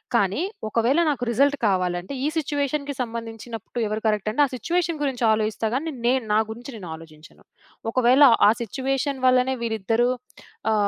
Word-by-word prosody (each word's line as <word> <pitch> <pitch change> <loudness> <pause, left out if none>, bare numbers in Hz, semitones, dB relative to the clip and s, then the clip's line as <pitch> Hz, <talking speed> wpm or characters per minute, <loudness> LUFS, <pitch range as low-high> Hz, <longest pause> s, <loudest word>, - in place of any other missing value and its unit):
కానీ 200 - +2 0.3
ఒకవేళ 235 +8 +2
నాకు 275 -4 -1
రిజల్ట్ 280 +5 +3
కావాలంటే, 180 +2 -1
ఈ - - +2
సిట్యుయేషన్‌కి 285 -1 -1
సంబంధించినప్పుడు 230 0 -6
ఎవరు 215 +1 -3
కరెక్ట్ 210 -1 0
అంటే 250 - +1
ఆ! - - -3
సిట్యుయేషన్ 335 +5 -1
గురించి 265 -4 -2
ఆలోజిస్తా 220 +1 0
గాని 315 +5 -2
నేను 255 +1 +2
నా 215 - +4
గురించి 240 +4 -8
నేను 185 -6 -8
ఆలోచించను. 160 -1 -15 0.5
ఒకవేళ 255 +3 +5 0.2
ఆ! - - +7
సిట్యుయేషన్ 265 +3 -2
వల్లనే 255 +1 +3
వీరిద్దరూ 225 +2 +1 0.6
ఆ! - - +3
240 Hz, 150 wpm, -24 LUFS, 215-275 Hz, 0.6 s, ఆ